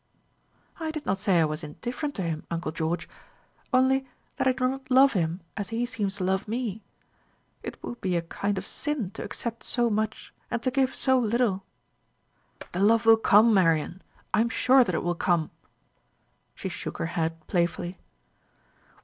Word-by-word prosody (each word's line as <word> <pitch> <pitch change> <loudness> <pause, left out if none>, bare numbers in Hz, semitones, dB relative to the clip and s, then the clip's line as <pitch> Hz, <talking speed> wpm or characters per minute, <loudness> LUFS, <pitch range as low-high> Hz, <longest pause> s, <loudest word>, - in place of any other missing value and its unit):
"I 320 -1 -2
did 310 -1 -5
not 190 +1 0
say 190 -3 +3
I 160 - +5
was 155 +2 -4
indifferent 245 - -5
to 195 - -2
him, 160 -2 -3
uncle 170 -1 -2
George; 165 +1 -2 0.6
only 265 +1 +3 0.3
that - - +1
I - - +6
do 255 0 +1
not 265 +1 -5
love 265 +2 +6
him 170 -1 -1
as 205 -2 -4
he 230 +1 -1
seems 210 -5 -2
to 195 - -4
love 190 +2 0
me. 220 -2 -3 0.8
It - - -6
would 240 - -6
be 185 -2 0
a 170 - 0
kind 200 +4 -2
of 190 - -4
sin 280 - -3
to - - -6
accept 230 -1 -5
so 240 -2 +1
much 215 +1 -2 0.2
and 235 -2 -2
to 255 - +1
give 265 0 +1
so 260 -1 +3
little." 225 -4 +1 1.1
"The 180 - -3
love 225 +3 +4
will 225 0 +9
come, 220 +1 +6
Marian; 170 -1 +2 0.3
I 210 - +4
am 235 - +1
sure 255 +3 +5
that 185 -7 -2
it - - -1
will 175 0 +1
come." 170 -2 +1 1.0
She - - -5
shook - - -5
her - - -2
head 165 0 -1
playfully. 175 0 -1
210 Hz, 180 wpm, -27 LUFS, 175-250 Hz, 1.1 s, will